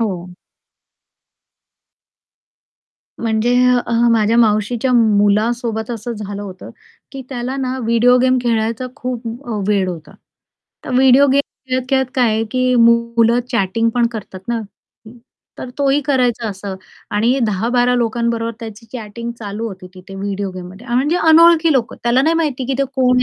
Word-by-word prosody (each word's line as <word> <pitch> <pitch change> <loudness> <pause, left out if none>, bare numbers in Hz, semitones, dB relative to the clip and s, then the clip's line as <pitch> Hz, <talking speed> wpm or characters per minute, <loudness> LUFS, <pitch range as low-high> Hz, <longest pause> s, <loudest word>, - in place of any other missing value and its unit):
हो. 185 -5 -3 2.9
म्हणजे 230 +1 0 0.3
अ, - - -3 0.2
माझ्या 225 0 +2
मावशीच्या 225 +3 +1
मुलासोबत 220 +1 +1
असं 235 0 -5
झालं 205 -2 -6
होतं 190 -2 -9 0.4
की 270 -1 -7
त्याला 255 0 -4
ना, 260 -1 -3
व्हिडिओ 235 +2 +4
गेम 255 0 +3
खेळायचा 230 +1 -1
खूप 250 -3 -5 0.2
अ, 220 -3 -3
वेड 200 -3 +1
होता. 165 -3 -8 0.7
तर - - -6
व्हिडिओ 265 +2 +5
गेम 280 - +4 0.3
खेळत-खेळत 260 +1 0
काय 250 -3 +3
आहे 220 +1 0
की 255 0 +1
मुलं 235 0 +3
चॅटिंग 230 0 0
पण 240 -1 +3
करतात 200 -4 -8
ना, 235 -1 -1 1.0
तर 255 - -7
तोही 280 0 +2
करायचा 250 -4 0
असं 195 -1 -6 0.4
आणि 230 +6 +2
10-12 245 +5 +1
लोकांबरोबर 235 -1 -1
त्याची 225 0 -9
चॅटिंग 235 -1 -6
चालू 210 +1 -5
होती 185 -3 -10
तिथे 185 +1 -12
व्हिडिओ 200 0 -4
गेममध्ये 185 +5 -10
अ, 240 - -3
म्हणजे 285 +7 +1
अनोळखी 330 0 +6
लोक. 250 -4 0
त्याला 240 +2 +1
नाही 320 +3 +2
माहिती 295 -6 -1
की 270 - -1
ते 275 - +2
कोण 250 -1 +3
235 Hz, 140 wpm, -17 LUFS, 215-255 Hz, 2.9 s, अनोळखी